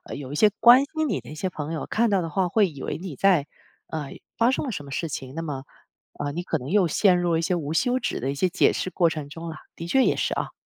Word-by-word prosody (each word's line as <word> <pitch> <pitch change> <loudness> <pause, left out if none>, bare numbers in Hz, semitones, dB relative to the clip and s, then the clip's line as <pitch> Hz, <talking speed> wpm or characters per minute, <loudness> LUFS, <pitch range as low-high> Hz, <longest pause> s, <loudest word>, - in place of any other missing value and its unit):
有 140 -1 -7
一 - - -3
些 210 +7 +5
关 240 +2 +9
心 315 +2 -2
你 - - -1
的 - - -13
一 150 - -8
些 185 - -2
朋 155 -3 -5
友 160 - -3
看 230 +1 +1
到 195 -3 +2
的 165 - -4
话， 185 +2 +1
会 210 +1 +3
以 140 -6 -10
为 - - -3
你 175 -5 -7
在， 180 -5 +3 0.4
呃 150 -3 -5 0.3
发 230 +1 +3
生 265 - 0
了 255 - -3
什 150 -8 -5
么 140 - -11
事 155 +4 -2
情， 135 -2 -6
那 165 - -3
么， 140 -4 -5 0.5
呃， 145 -1 -3
你 170 - -3
可 175 - -1
能 130 +4 -7
又 195 -3 +4
陷 180 +2 +3
入 175 -1 +1
了 160 - +2
一 - - -1
些 180 - +1
无 155 -4 -2
休 250 +10 +1
止 - - -2
的 135 +3 -2
一 - - -4
些 185 +6 +1
解 185 - +3
释 - - -2
过 175 -2 +2
程 145 -2 -5
中 165 +2 -8
啦。 160 -2 -6 0.2
的 165 - -7
确 260 +10 +3
也 - - +2
是 - - -1
啊。 - - -3
170 Hz, 320 characters per minute, -25 LUFS, 150-195 Hz, 0.5 s, 关